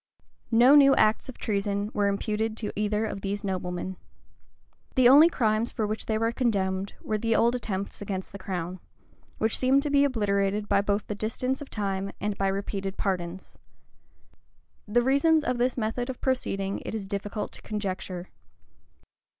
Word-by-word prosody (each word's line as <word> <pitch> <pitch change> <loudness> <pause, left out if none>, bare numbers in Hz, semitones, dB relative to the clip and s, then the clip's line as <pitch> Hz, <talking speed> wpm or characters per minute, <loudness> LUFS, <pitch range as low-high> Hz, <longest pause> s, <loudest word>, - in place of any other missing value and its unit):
No 240 +4 +6
new 275 -2 +7
acts 215 +4 +2
of 260 - -8
treason 205 0 -1
were 205 -1 +1
imputed 215 +2 -1
to 210 -2 -4
either 210 +1 0
of 195 -2 -5
these 200 +1 -3
noblemen. 185 -1 -3 1.0
The 255 -2 +6
only 295 +6 +8
crimes 220 -5 +1
for 220 - -2
which 215 +1 -3
they 220 - +1
were 225 +1 +1
condemned, 195 -5 -1
were 215 -1 -1
the 225 +1 +1
old 235 +2 +3
attempts 200 -6 -4
against 190 -2 -4
the 200 - -9
crown, 180 -1 -4 0.6
which 220 0 +2
seemed 265 +2 +3
to 295 - -2
be 285 0 +5
obliterated 205 -5 0
both 200 0 +2
by 200 0 +3
the - - -4
distance 250 +6 -2
of 290 - -8
time 195 -2 -2
and 210 0 -2
by 195 - 0
repeated 195 0 -3
pardons.[*] 185 -2 -3 1.3
The 240 +3 +2
reasons 290 +4 +3
of 250 -3 -1
this 250 +1 +1
method 240 +2 -2
of 255 - -5
proceeding 200 -7 -1
it - - -5
is 200 -3 -5
difficult 205 +1 -4
to - - -10
conjecture. 190 -3 -4
210 Hz, 165 wpm, -27 LUFS, 195-240 Hz, 1.3 s, only